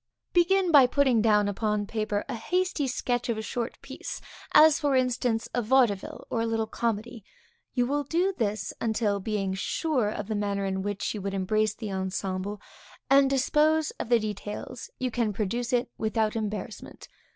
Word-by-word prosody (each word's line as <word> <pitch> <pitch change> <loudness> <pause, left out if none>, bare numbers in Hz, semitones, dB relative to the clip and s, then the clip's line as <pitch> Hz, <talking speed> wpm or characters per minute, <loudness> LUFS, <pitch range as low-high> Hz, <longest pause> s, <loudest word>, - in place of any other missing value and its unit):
Begin 360 +1 +3
by 280 -5 +8
putting 260 -3 +3
down 210 -2 +4
upon 210 0 -1
paper 215 -1 -2
a - - -4
hasty 355 +5 -1
sketch 245 -1 -1
of 230 - 0
a 220 - -4
short 235 +2 -4
piece, - - -7 0.3
as 310 -1 +7
for 290 -3 +1
instance 245 -3 +1
a 245 - +1
vaudeville, 235 -4 +1
or 230 - 0
a - - 0
little 225 -1 0
comedy. 230 0 -3 0.5
You 245 -1 +2
will 290 +3 0
do 350 +7 +1
this 210 -3 -2
until, 220 -3 0
being 195 -1 -2
sure 250 - 0
of 205 -1 -5
the 220 - -2
manner 200 -1 -1
in 190 0 -1
which 205 0 -2
you 210 - -5
would 195 0 -3
embrace 215 +2 +1
the 215 -3 -6
ensemble, 190 +1 -3 0.5
and 275 0 +6
dispose 300 +4 +2
of - - -4
the 240 - +6
details, 210 +3 -5
you 255 -1 -2
can 225 -3 0
produce 230 +4 -2
it 245 -1 0
without 220 0 0
embarrassment. 215 -1 -5
225 Hz, 175 wpm, -27 LUFS, 205-255 Hz, 0.5 s, by